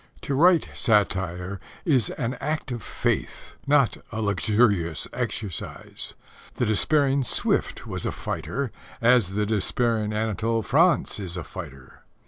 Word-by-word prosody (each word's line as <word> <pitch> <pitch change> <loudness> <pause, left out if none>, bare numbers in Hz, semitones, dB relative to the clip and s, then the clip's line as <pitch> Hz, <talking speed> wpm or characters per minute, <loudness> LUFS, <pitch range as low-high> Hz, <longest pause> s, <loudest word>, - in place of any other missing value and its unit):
To 140 - -3
write 170 +4 +5
satire 95 -4 +1 0.3
is 130 - +3
an 125 +2 -3
act 155 -3 -2
of 120 -2 -4
faith, - - -2
not 140 -6 +3
a 110 - -4
luxurious 100 -5 +2
exercise. 100 -8 -4 0.4
The - - 0
despairing 135 +5 +2
Swift - - 0
was - - -5
a - - -1
fighter, 135 -1 -3 0.3
as 115 -6 +4
the 105 0 +1
despairing 110 +1 0
Anatole 110 +1 0
France 165 -3 +3
is 90 -3 -5
a 85 - -4
fighter. 65 -3 -10
110 Hz, 125 wpm, -25 LUFS, 100-130 Hz, 0.4 s, write